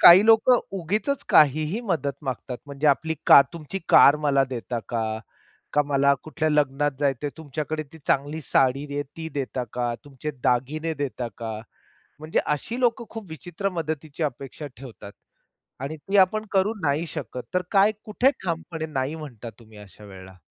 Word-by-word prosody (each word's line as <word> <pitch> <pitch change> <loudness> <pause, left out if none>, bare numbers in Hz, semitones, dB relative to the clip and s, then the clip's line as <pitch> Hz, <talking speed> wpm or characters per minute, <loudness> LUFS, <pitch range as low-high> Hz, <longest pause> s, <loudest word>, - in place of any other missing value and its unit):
काही 185 +4 +10
लोकं 225 +2 +6 0.2
उगीचच 210 - -1
काहीही 155 - +4
मदत 165 - -1
मागतात, 130 -1 -4
म्हणजे 140 +1 -2
आपली 160 +3 +2
का - - +10
तुमची 170 +3 -6
कार 145 +2 +8
मला 140 -1 +4
देता 120 -1 -3
का, 110 -2 -2 0.5
का 150 - +4
मला 140 0 +3
कुठल्या 155 0 -1
लग्नात 145 -1 +2
जायचं 140 -1 0
आहे, 145 - -2
तुमच्याकडे 155 0 -4
ती 160 - -12
चांगली 145 +3 0
साडी 135 +2 +2
आहे, 145 - 0
ती 160 0 -5
देता 130 -2 -2
का, 120 -1 -1
तुमचे 145 +2 -6
दागिने 155 +6 0
देता 130 -5 -3
का? 115 -2 -4 0.6
म्हणजे 155 +1 -2
अशी 225 - -2
लोकं 235 -1 +1
खूप 220 -5 -8
विचित्र 175 +4 -4
मदतीची 160 -3 -4
अपेक्षा 140 +1 -4
ठेवतात 115 -5 -11 0.7
आणि 150 +3 -4
ती 195 +8 -1
आपण 215 +3 +4
करू 200 +2 +2
नाही 150 +2 +1
शकत, 140 -5 -6
तर 180 - +2
काय, 200 +2 +5
कुठे 245 +6 +3
ठामपणे 165 -2 -3
नाही 140 0 -2
म्हणता 125 -7 -8
तुम्ही 110 -2 -16
अशा 105 0 -14
वेळेला? 95 -1 -12
150 Hz, 160 wpm, -25 LUFS, 135-170 Hz, 0.7 s, काही